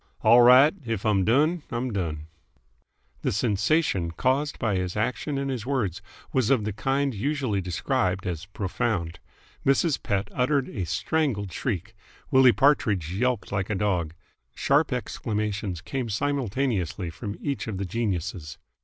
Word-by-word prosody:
"All 115 +3 +7
right! 130 +5 +7
If 115 -4 -3
I'm 100 -3 +3
done, 150 - +2
I'm 120 0 -3
done!" 80 -6 -3 1.0
The - - 0
sensation 105 - +1
caused 130 - 0
by 110 -4 0
his 90 +1 -2
action 125 +6 -1
and 135 0 -2
his 125 -4 -3
words 115 - -1 0.3
was 130 -5 +2
of 130 -6 +3
the 105 -1 -2
kind 135 +5 0
usually 125 -3 -1
described 90 +1 -1
as 85 -2 -4
profound. 90 -3 -2 0.4
Mrs. 140 +2 +2
Pett 100 -1 -1
uttered 135 +1 +1
a 95 -5 -4
strangled 100 - -1
shriek. 110 - -3 0.4
Willie 130 -2 +7
Partridge 105 - +2
yelped 125 +2 -1
like 95 -1 -1
a 105 - 0
dog. 90 -5 -1 0.4
Sharp 145 +2 +2
exclamations 105 -6 -3
came 125 +3 -4
simultaneously 115 - -1
from 100 +5 -6
each 140 -5 -3
of 105 -4 -3
the 100 - -2
geniuses. 90 -6 -3
110 Hz, 145 wpm, -26 LUFS, 95-130 Hz, 1.0 s, All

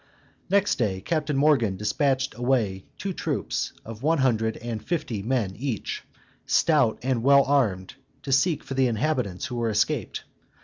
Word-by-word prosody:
Next 200 -3 +2
day 100 -5 0
Captain 150 - -1
Morgan 135 -9 +3
dispatched 130 +6 0
away 115 -6 0
two 195 -1 -3
troops, - - -2
of 115 0 -9
one 160 +4 +2
hundred 115 -5 +1
and 115 -2 -5
fifty 125 - -2
men 110 -4 -1
each, 125 -3 -3 0.5
stout 145 -9 +3
and 130 -2 0
well 140 +2 +6
armed, 110 -10 +1 0.3
to 135 - -4
seek 150 +3 +2
for - - -6
the 135 -1 +3
inhabitants 120 -5 -1
who 125 - -5
were 115 -1 0
escaped. 110 +2 -1
125 Hz, 150 wpm, -25 LUFS, 110-140 Hz, 0.5 s, well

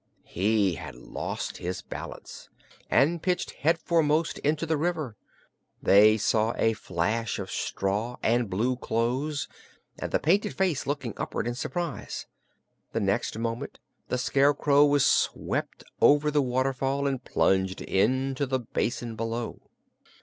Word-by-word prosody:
He 100 0 +1
had 75 -3 -8
lost - - -5
his 90 +1 -4
balance - - -8 0.4
and 155 +6 +3
pitched 180 -1 -1
headforemost 165 0 +2
into 155 +2 0
the 160 0 +1
river. 155 -7 -2 0.6
They 105 +2 +6
saw 110 +1 +1
a 115 - +3
flash 105 +3 -2
of 95 - -5
straw 105 +5 -2
and 120 -1 +2
blue 120 +7 0
clothes, 130 +6 -1 0.5
and - - -4
the - - +3
painted 200 +7 +1
face 185 -7 0
looking 135 -6 -2
upward - - -3
in 120 - -1
surprise. 170 +4 -4 0.7
The - - 0
next - - 0
moment 115 +4 -3 0.3
the 125 - -1
Scarecrow 140 +2 +4
was 145 -1 +3
swept - - 0 0.2
over 150 +1 +5
the 145 -1 +3
waterfall 135 +2 0
and 135 -2 -1
plunged 95 -3 +1
into 130 +7 +1
the 130 0 +1
basin 120 -1 -3
below. 115 +1 -4
125 Hz, 130 wpm, -27 LUFS, 110-145 Hz, 0.7 s, They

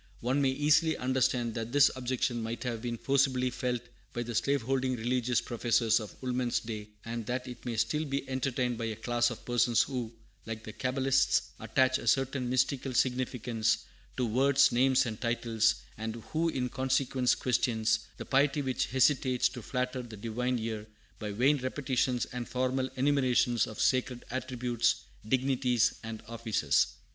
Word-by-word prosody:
One 130 +4 +1
may 135 - +3
easily 150 +4 +3
understand 125 -2 +1
that 115 0 -4
this 145 0 +6
objection 125 -2 -1
might 115 +1 -4
have 120 -3 -3
been 120 -1 -3
forcibly 130 -1 +2
felt 125 -1 -2 0.3
by 120 -2 -2
the 120 0 -5
slave 140 +3 +1
holding 130 +1 0
religious 120 +1 0
professors 115 -1 +2
of 105 -2 -8
Woolman's 125 -2 0
day, 110 -2 -6 0.2
and 115 0 -4
that 125 +1 -2
it 125 -1 -9
may 115 -2 -2
still 150 +7 0
be 140 -1 -3
entertained 130 -2 -1
by 115 - -2
a 110 -1 -3
class 120 +2 +1
of 120 - -8
persons 120 -1 +3
who, 125 -4 -4 0.4
like 110 -1 -5
the 110 - -8
Cabalists, 135 +1 +1
attach 130 +4 +2
a - - -8
certain 135 -1 +1
mystical 130 0 0
significance 120 -4 0 0.3
to 125 - +1
words, 135 +4 +4
names, 130 +2 +3
and 110 -3 -5
titles, 115 -2 +1 0.2
and 110 0 -3 0.2
who 165 +1 +2
in 130 -5 -1
consequence 130 0 +1
question 120 -3 0 0.3
the - - -6
piety 140 +1 +2
which 130 -1 -1
hesitates 130 -1 +3
to 120 - -8
flatter 125 +2 -2
the 115 -3 -10
Divine 120 +4 -1
ear 110 -2 -4 0.3
by 105 -1 -4
"vain 135 +8 +3
repetitions" 130 -1 0
and 125 -1 -6
formal 130 +1 0
enumeration 130 -3 +2
of 110 - -9
sacred 130 -1 +1
attributes, 120 -3 0 0.3
dignities, 125 -2 +2
and 110 -1 -7
offices. 110 -11 +1
125 Hz, 160 wpm, -30 LUFS, 115-130 Hz, 0.4 s, this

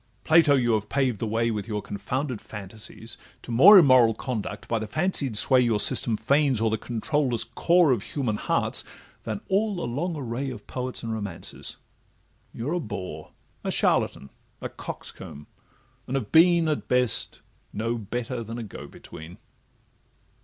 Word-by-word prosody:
Plato! 155 -3 +5
you 120 -3 +1
have 105 -1 -1
paved 130 -6 0
the 115 - -2
way, 115 +2 0
With 105 -1 -4
your 105 -2 -2
confounded 120 +5 -4
fantasies, 110 +3 -9 0.3
to - - -8
more 140 - +9
Immoral 130 - +6
conduct 110 -4 -5
by 115 - 0
the 110 - -5
fancied 145 - 0
sway 130 +4 +7
Your 115 -4 +1
system 110 +2 +2
feigns 135 +3 +2
o'er 110 -1 +1
the 110 - 0
controulless 120 0 0
core 170 +6 +3
Of 120 -5 +1
human 120 -5 -3
hearts, - - -1 0.4
than 110 -3 -4
all 205 +2 +1
the 175 - -4
long 155 +9 -3
array 135 -1 -4
Of 110 -5 -9
poets 125 -1 -5
and 115 -1 -3
romancers:—You're 110 - -8
a 180 - 0
bore, 90 - -7 0.3
A - - -2
charlatan, 70 - 0 0.3
a - - -5
coxcomb—and 75 - -10
have 120 -7 -3
been, 170 0 +5
At 155 -2 -2
best, 125 -3 0 0.3
no 115 +3 -2
better 120 +3 -4
than 115 +2 -7
a 120 - -5
go 105 - -9
between. 80 +3 -12
120 Hz, 155 wpm, -25 LUFS, 110-140 Hz, 0.4 s, more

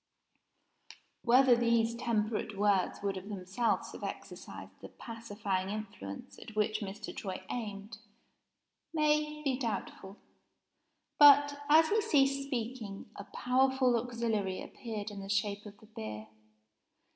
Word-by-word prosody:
Whether 250 +1 +6
these 235 -1 +2
temperate 220 -3 -1
words 200 -2 +1
would 195 -1 -1
of 190 +2 -8
themselves 200 +4 -1
have - - -10
exercised - - -7
the - - -9
pacifying 205 -5 -4
influence 100 - -7
at 220 - -11
which 215 0 +1
Mr. 210 0 -6
Troy 185 -2 -5
aimed 210 -2 -5 1.0
may 300 0 +1
be 270 -3 0
doubtful. 205 -4 -4 1.0
But, 285 0 +8
as 315 +1 +7
he 435 +1 +3
ceased 275 -5 +2
speaking, 230 -6 -5
a 200 - -8
powerful 260 +1 +2
auxiliary 225 -5 -1
appeared 215 -3 -6
in 200 -1 -7
the 195 - -8
shape 205 +1 -1
of 205 0 -12
the 215 - -17
beer. 110 - -7
220 Hz, 120 wpm, -32 LUFS, 200-255 Hz, 1.0 s, But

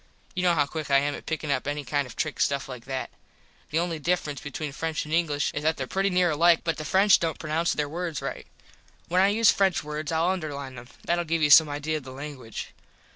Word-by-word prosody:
You 180 - -2
know 175 -1 +3
how 145 -2 +3
quick 155 +1 -6
I 140 - +5
am 145 +1 +1
at - - -9
pickin 155 -2 -2
up 130 0 -1
any 145 0 -2
kind 145 +1 -1
of 125 - -11
trick 155 -2 -3
stuff 140 -1 +1
like 125 -3 -9
that. 130 0 -4 0.6
The 155 - -1
only 170 -1 -1
difference 150 -4 -1
between 150 +1 -5
French 160 +3 -3
and 155 - -6
English 155 -4 +1
is 145 - -3
that 160 +1 +1
there 130 - -3
pretty 195 +9 0
near 180 -2 +2
alike 165 +2 +4
but 165 -1 -1
the 155 - -5
French 195 +6 +5
dont 165 -2 -1
pronounce 160 +2 0
there 150 -1 -1
words 165 0 -4
right. - - -6 0.6
When 180 +2 +3
I 195 - +5
use 215 +2 +5
French 195 -2 +1
words 150 0 -4
Ill 165 +1 +1
underline 145 -7 -3
them. 120 -1 -10 0.2
Thatll 175 0 0
give 165 0 0
you 145 - +4
some 155 +1 +9
idea 150 +2 -2
of 150 - -8
the 130 0 -9
languige. 135 -5 -7
155 Hz, 240 wpm, -26 LUFS, 145-170 Hz, 0.6 s, some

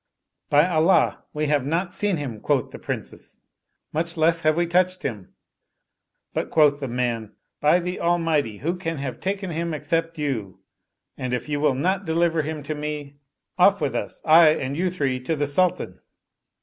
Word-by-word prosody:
" - - -58
By 150 +3 +5
Allah 170 +1 +2
we 150 0 -2
have 145 -2 +1
not 170 +6 -1
seen 205 -4 +1
him," 130 -7 -5
quoth - - 0
the - - -9
Princes, - - -7 0.3
" - - -52
much 165 +2 -1
less 165 +1 +2
have 155 0 +2
we 175 - +2
touched 185 +2 +1
him 105 -8 -5 0.5
"; - - -55
but - - -2
quoth 145 -2 +4
the 135 - -4
man, 120 -3 -2
" - - -57
By 150 +4 +4
the 180 +1 -4
Almighty, 165 -10 +1
who 170 - -2
can 165 -3 -3
have 135 -3 -5
taken 195 -1 -3
him 165 0 -2
except 165 +1 -2
you? 120 - -3 0.6
and 125 -1 -1
if 125 - -5
you 145 -1 -1
will 145 -3 +2
not 185 +8 0
deliver 165 0 +1
him 155 0 -5
to 150 +2 -3
me, 150 -1 -5 0.4
off - - +6
with - - -1
us, - - -4
I 160 0 +8
and 135 +1 -3
you 180 +4 0
three, 140 -8 -1
to 145 +6 -2
the 145 -1 0
Sultan." 175 +6 0
155 Hz, 190 wpm, -24 LUFS, 140-170 Hz, 0.6 s, I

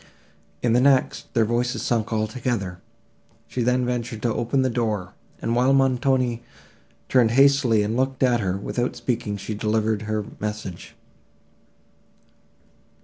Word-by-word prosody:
In 120 -2 +2
the 125 - +4
next, 135 -1 +2
their 115 -2 +4
voices 120 +3 -1
sunk 115 -2 0
all 110 -1 +1
together; 110 -6 -3 0.7
she 125 - -3
then 125 +1 +2
ventured 120 -3 -3
to 120 -2 +1
open 130 +3 0
the 130 - +1
door, 110 -6 -2 0.3
and, 115 - -1
while 125 +3 +3
Montoni 130 -2 +2 0.7
turned 125 -3 +4
hastily 130 -3 +4
and 110 +2 -2
looked 130 +1 0
at 125 -2 +3
her, 95 -3 -1
without 120 +5 -2
speaking, 115 -4 -2
she 105 +2 -5
delivered 110 0 0
her 110 -1 -1
message. 105 -4 -6
120 Hz, 140 wpm, -23 LUFS, 110-125 Hz, 0.7 s, the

